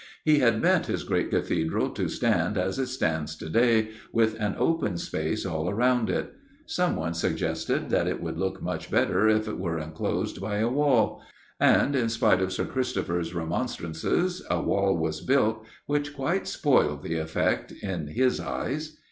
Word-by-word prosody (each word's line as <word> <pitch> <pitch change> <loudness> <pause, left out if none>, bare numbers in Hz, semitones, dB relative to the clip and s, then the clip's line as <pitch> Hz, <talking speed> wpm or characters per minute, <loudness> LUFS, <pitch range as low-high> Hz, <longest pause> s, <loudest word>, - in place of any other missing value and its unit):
He 155 -1 +5
had 115 -4 +3
meant - - +3
his - - -2
great - - 0
Cathedral 80 0 0
to - - -2
stand 105 - +1
as 95 +6 -1
it 130 - 0
stands 80 - -1
to 80 - -8
day, 115 +3 +3 0.2
with 110 -1 +2
an 105 -2 -1
open 105 - +1
space - - -2
all 80 +2 -1
round 120 +1 +2
it. - - -2 0.3
Someone 85 - 0
suggested 85 - -1
that - - +2
it - - -1
would - - -4
look 95 0 -3
much - - -4
better 100 +4 +3
if 110 0 +2
it - - -4
were 85 -3 -2
enclosed 80 0 -3
by 105 -1 -2
a 110 +2 +2
wall. 130 -4 +2 0.4
And, 140 - +4
in 120 -4 +1
spite 110 -4 +3
of 95 0 0
Sir 95 - -1
Christopher's 90 -9 -2
remonstrances, 85 - -1
a - - +1
wall 100 -2 +1
was 80 -1 -2
built, 110 -5 +2 0.2
which 145 0 -1
quite 170 +8 -1
spoilt 75 - +2
the 85 - -2
effect 80 0 -1
in 90 -6 -5
his 125 - +1
eyes. 155 +3 -4
110 Hz, 170 wpm, -27 LUFS, 85-130 Hz, 0.4 s, He